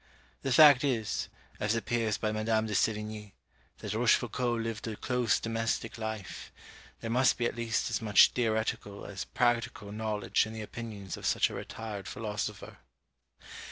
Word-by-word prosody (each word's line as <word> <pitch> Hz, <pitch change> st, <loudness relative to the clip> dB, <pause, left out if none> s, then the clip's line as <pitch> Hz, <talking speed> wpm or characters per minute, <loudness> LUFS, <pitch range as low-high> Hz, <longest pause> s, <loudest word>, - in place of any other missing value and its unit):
The 135 Hz, -, -2 dB
fact 145 Hz, 0 st, +8 dB
is, 120 Hz, -7 st, -1 dB, 0.3 s
as 105 Hz, +2 st, +1 dB
appears 115 Hz, -2 st, 0 dB
by 110 Hz, -, -1 dB
Mad. 110 Hz, +1 st, -3 dB
de 110 Hz, -1 st, +1 dB
Sévigné, 105 Hz, 0 st, -1 dB, 0.5 s
that 105 Hz, -, -4 dB
Rochefoucault 120 Hz, +1 st, +2 dB
lived 115 Hz, 0 st, -4 dB
a 110 Hz, -, -3 dB
close 125 Hz, -1 st, +1 dB
domestic 115 Hz, 0 st, -2 dB
life; 110 Hz, -3 st, -5 dB, 0.5 s
there 115 Hz, -, -3 dB
must 125 Hz, +2 st, +3 dB
be 120 Hz, -, 0 dB
at -, -, -1 dB
least 115 Hz, -1 st, -1 dB
as -, -, -1 dB
much 105 Hz, -2 st, +6 dB
theoretical 110 Hz, -3 st, -1 dB
as 95 Hz, -2 st, -5 dB
practical 115 Hz, -4 st, 0 dB
knowledge 105 Hz, -1 st, 0 dB
in 110 Hz, -, -8 dB
the 110 Hz, -1 st, -5 dB
opinions 105 Hz, -4 st, -7 dB
of -, -, -3 dB
such -, -, +2 dB
a -, -, -8 dB
retired 105 Hz, -3 st, -6 dB
philosopher. 105 Hz, -1 st, -5 dB
110 Hz, 155 wpm, -30 LUFS, 105-115 Hz, 0.5 s, fact